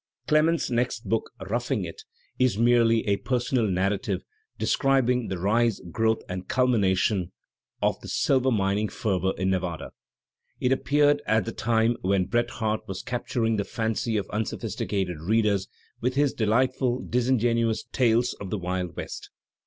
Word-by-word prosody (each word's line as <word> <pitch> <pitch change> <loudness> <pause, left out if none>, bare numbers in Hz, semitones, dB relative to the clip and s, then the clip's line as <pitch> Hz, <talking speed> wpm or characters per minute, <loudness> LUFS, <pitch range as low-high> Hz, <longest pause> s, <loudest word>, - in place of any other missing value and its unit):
Clemens's 155 0 +2
next 120 -1 -1
book, 115 0 0
"^Roughing 105 0 -2
It," 85 - -8 0.4
is 125 -5 +2
"merely 115 -1 +4
a 100 -1 +2
per 130 - -2
sonal 120 -3 0
narrative" 95 +2 -1 0.3
describing 125 -3 +2
"the 95 - -3
rise, 110 +4 +2
growth 110 +2 +1
and 90 0 -5
culmination 100 -7 +2 0.5
of - - +1
the - - -9
silver 130 -1 +2
mining 105 -2 +1
fever 95 -3 0
in 95 +1 0
Nevada." 90 -3 -3 0.7
It 125 - +1
appeared 145 +2 +3
at 110 0 +2
the 115 - -3
time 115 +1 +1
when 95 0 +1
Bret 120 +4 0
Harte 110 -1 -2
was 95 -1 -5
capturing 120 -2 -1
the 100 - 0
fancy 110 +1 -1
of 100 - -1
unso 110 +1 -2
phisticated 100 -5 -2
readers 100 +2 +1 0.3
with 125 +2 -1
his 145 -1 +2
delightful, 125 +3 +1
disingenuous 115 -2 +1
tales 120 -1 +2
of 100 - -5
the 105 - -2
Wild 90 -1 -3
West. - - -7
115 Hz, 150 wpm, -26 LUFS, 100-125 Hz, 0.7 s, merely